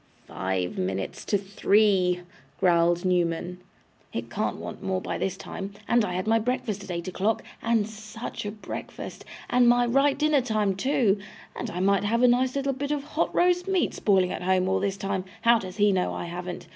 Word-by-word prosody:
'Five 95 -1 -2
minutes 95 +1 -3
to 205 - +2
three,' 195 -2 +2 0.4
growled 175 -1 +3
Newman; 180 0 0 0.5
'it - - -5
can't - - -1
want - - -7
more 190 -1 -1
by - - -4
this 190 0 -2
time; 195 0 -7
and 240 -1 +4
I 180 - -2
had 185 - -2
my 225 +1 +3
breakfast 220 -4 -2
at 195 - -11
eight 170 0 -4
o'clock, 195 +4 0 0.2
and 225 -2 +1
SUCH 220 +1 -7
a - - -1
breakfast! 210 0 -7 0.2
and 245 -1 +4
my 245 0 +4
right 275 +4 +3
dinner 300 -1 +3
time 215 -5 0
two! 215 -3 +2 0.4
And - - -4
I 180 - -3
might 200 +1 +3
have 230 +4 +2
a - - +8
nice 250 +2 +2
little 275 0 0
bit 280 +2 -4
of 295 -2 -1
hot 295 - -1
roast 360 +1 +3
meat 380 -2 +1
spoiling 190 -3 +2
at - - -4
home 185 0 +2
all 190 0 +2
this 195 0 -1
time 195 -1 -2 0.2
how 235 0 +6
does 185 -1 -8
HE 205 -1 +4
know 185 -2 +1
I - - -4
haven't? 175 +1 -6
200 Hz, 195 wpm, -26 LUFS, 185-240 Hz, 0.5 s, a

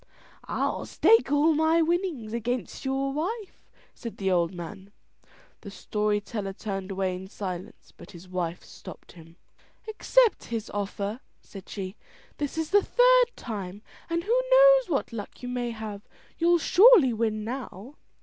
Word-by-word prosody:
"I'll - - -2
stake 450 -11 +4
all 295 +2 +4
my 320 +2 +3
winnings 325 - -2
against 240 +2 -3
your 270 +1 -1
wife," 390 +8 -5 0.2
said 230 -3 -8
the 190 -1 -1
old 170 -2 +2
man. 190 +3 -9 0.7
The 205 - -10
story 210 +1 -1
teller 205 -2 -5
turned 195 -1 -5
away 190 -1 -1
in 185 +1 -8
silence, 190 -1 -7
but - - -14
his 180 -1 -13
wife 180 -2 -4
stopped - - -12
him. 165 -1 -16 0.5
"Accept 460 +2 +2
his 230 -2 -5
offer," 205 +2 -3 0.2
said 195 -2 -13
she. 195 0 -6 0.4
"This 290 +2 -4
is 320 +1 -2
the 410 +1 +6
third - - +4
time, 205 -3 -7 0.3
and 335 0 -1
who 475 +5 +2
knows - - +6
what 275 -6 -1
luck 215 +2 -8
you 245 - -4
may 245 -1 -2
have? 220 -3 -6 0.4
You'll 345 +1 +4
surely 365 - +6
win 215 -1 -1
now." 240 0 -7
230 Hz, 150 wpm, -27 LUFS, 195-330 Hz, 0.7 s, the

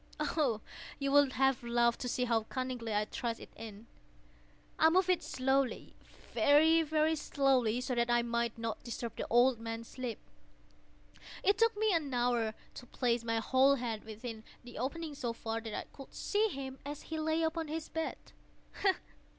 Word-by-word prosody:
Oh, 295 -7 0 0.4
you 275 -1 -1
would 285 -2 +5
have 270 -1 +2
laughed 235 0 +2
to 250 - -2
see 250 - 0
how 230 -2 +2
cunningly 255 -2 -4
I 210 0 +1
thrust 230 +1 -3
it - - -12
in! 220 -1 -9 0.9
I 320 - +7
moved 370 +2 +3
it 360 - +1
slowly—very, 285 +4 +2
very 315 0 +2
slowly, 260 -6 +2
so 250 - -2
that 235 0 +1
I 240 0 +3
might 235 0 -1
not 230 -1 -3
disturb 235 -1 -5
the - - -4
old 240 0 +4
man's 225 0 -5
sleep. 250 -3 -5 1.3
It 400 0 +3
took 455 -2 +3
me 430 -1 +2
an 310 -5 0
hour 240 -3 +1 0.2
to 250 - -10
place 240 -2 0
my 230 0 0
whole 260 +4 +4
head 235 -4 -3
within 220 0 -7 0.2
the 245 -2 -9
opening 305 +5 -3
so 240 -4 -3
far 225 0 -4
that 225 -2 -6
I - - -3
could 275 - -11
see 425 +2 +1
him 270 -7 -6
as 290 +1 -6
he 320 -1 -4
lay 315 +1 +1
upon 320 0 -1
his 315 +1 -4
bed. 320 0 -3
255 Hz, 170 wpm, -33 LUFS, 230-300 Hz, 1.3 s, I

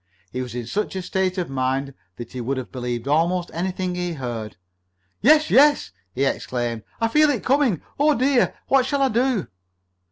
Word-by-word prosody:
He 130 - -3
was 125 -2 -6
in 120 -1 -4
such 200 - -3
a 190 - -2
state 190 +1 -1
of 180 - -1
mind 135 +1 -1 0.2
that 120 - -9
he 125 - -5
would 130 +3 -2
have 130 - -6
believed 120 -1 -4
almost 170 +4 +1
anything 185 +1 -2
he 180 -1 -3
heard. 120 -6 -5 0.7
"Yes! 310 +5 +5
Yes!" 290 - +5 0.2
he 135 +2 +1
exclaimed. 120 -4 -2 0.2
"I 225 - +2
feel 300 +6 +4
it 255 -7 -1
coming! 260 - +2 0.2
Oh, 300 +1 +4
dear! 260 0 +2
What 265 -1 +3
shall 280 0 +1
I 270 - +3
do?" 240 -3 +1
180 Hz, 185 wpm, -23 LUFS, -, 0.7 s, Yes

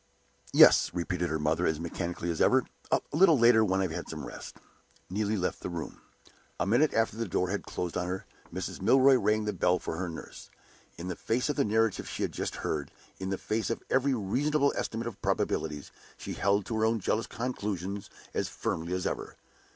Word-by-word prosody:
"Yes," - - +7
repeated 90 0 -1
her 80 - 0
mother, 75 +1 +1
as 80 -1 0
mechanically 85 +1 -3
as 80 - -3
ever; - - +5 0.3
"a - - +3
little 165 -1 +6
later 115 -2 +6
when 95 -2 +1
I - - +2
have 90 - -1
had 85 +2 -5
some 80 -2 -5
rest." - - -9 0.5
Neelie 105 +2 0
left 90 - -1
the - - -4
room. 85 -3 -6 0.6
The - - 0
minute 120 +10 +3
after 110 -1 +1
the 115 -1 -2
door 90 +1 0
had 105 - -3
closed 90 -2 -3
on 90 - -1
her, 95 +1 -4 0.3
Mrs. - - -5
Milroy 135 +1 +6
rang 110 -3 +2
the 105 - -1
bell 90 0 +2
for 80 - -5
her 90 0 -2
nurse. 80 - -9 0.5
In 85 - -6
the 90 - -3
face 120 - -1
of 145 - 0
the 140 - +2
narrative 110 0 +1
she - - -3
had - - -1
just - - -3
heard, 75 -2 -2 0.3
in 95 0 -3
the 95 - -1
face 110 +3 -2
of 115 - -3
every 135 +1 +3
reasonable 140 +8 +1
estimate 115 +1 -3
of 115 -4 -6
probabilities, 75 -2 -1 0.3
she - - -6
held 100 0 +1
to 115 - -3
her 110 - +3
own 115 0 +2
jealous 110 +3 0
conclusions 100 -5 -4 0.2
as - - -1
firmly 85 +2 -3
as 90 - -3
ever. - - -3
100 Hz, 205 wpm, -29 LUFS, 90-115 Hz, 0.6 s, Yes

